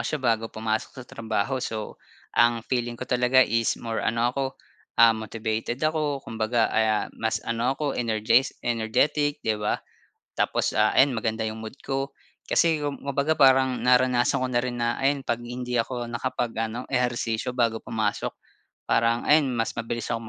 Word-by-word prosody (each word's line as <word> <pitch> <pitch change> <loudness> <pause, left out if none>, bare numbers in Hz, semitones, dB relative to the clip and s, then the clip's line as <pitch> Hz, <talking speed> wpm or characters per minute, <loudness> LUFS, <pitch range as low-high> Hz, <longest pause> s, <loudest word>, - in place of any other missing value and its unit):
siya 155 - -1
bago 115 -5 0
pumasok 110 0 -2
sa 130 - -8
trabaho. 115 +2 -2
So 110 -2 -5 0.3
ang 120 -1 +3
feeling 120 -2 -2
ko 130 - -5
talaga 125 +1 +4
is 115 +1 0
more 115 -1 -3
ano 115 +2 +1
ako, 135 +1 -1 0.5
ah, 115 -1 +7
motivated 110 +1 -3
ako. 150 -3 0
Kumbaga, 115 +1 0
ah, 110 -1 +2
mas 110 0 -1
ano 120 +3 0
ako 145 -2 -1
energes 115 +2 +2 0.2
energetic, 130 +6 0
di 110 - +2
ba? 105 - 0 0.6
Tapos - - 0
ah, - - +4
ayon 135 0 +5
maganda 110 -1 -2
yung 110 0 -5
mood 110 +5 -8
ko. 135 0 -2 0.4
Kasi 165 -3 +3
kumbaga 140 +1 -1
parang 130 -2 +5
naranasan 125 0 +3
ko 130 - 0
na 120 - 0
rin 125 -1 -3
na 120 0 +1
ayan 140 +1 +2
'pag 120 -3 -1
hindi 125 +1 -4
ako 120 +1 -2
nakapag-ano 120 -1 -3
ehersisyo 120 -2 -1
bago 120 -3 +1
pumasok 110 -2 -2 0.5
parang 115 0 +2
ayon 150 -2 +4
mas 115 -1 -1
mabilis 115 0 -4
akong 115 -1 -4
120 Hz, 160 wpm, -25 LUFS, 115-130 Hz, 0.6 s, ah